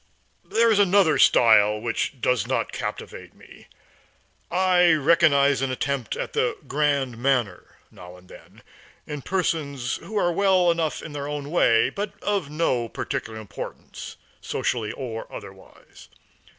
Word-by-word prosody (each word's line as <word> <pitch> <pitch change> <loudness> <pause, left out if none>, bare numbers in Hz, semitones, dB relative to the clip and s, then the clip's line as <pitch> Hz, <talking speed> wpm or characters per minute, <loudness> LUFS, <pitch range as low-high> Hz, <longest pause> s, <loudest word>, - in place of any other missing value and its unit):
There 230 0 +2
is 210 - +3
another 190 -6 +4
style 105 -2 +5
which 120 +4 -3
does 125 +1 0
not - - -1
captivate - - -7
me. - - -17 0.8
I 180 -1 +4
recognize 145 -3 +3
an 135 - 0
attempt 130 -2 -3
at - - -5
the - - 0
grand 140 -5 0
manner 120 -8 -1
now 90 0 -13
and 90 0 -19
then, - - -16 0.4
in 150 -2 -6
persons 140 -8 -2
who 210 +6 -7
are 175 -3 +2
well 185 -1 +3
enough 165 -2 -2
in - - -8
their 145 0 -5
way, 145 -5 +2
but 200 0 -4
of 200 -8 -1
no 130 -7 -1
particular 110 0 -5
importance, 105 -2 -9 0.2
socially 110 -3 -2
or 115 -3 -7
otherwise. - - -13
140 Hz, 135 wpm, -24 LUFS, 120-175 Hz, 0.8 s, style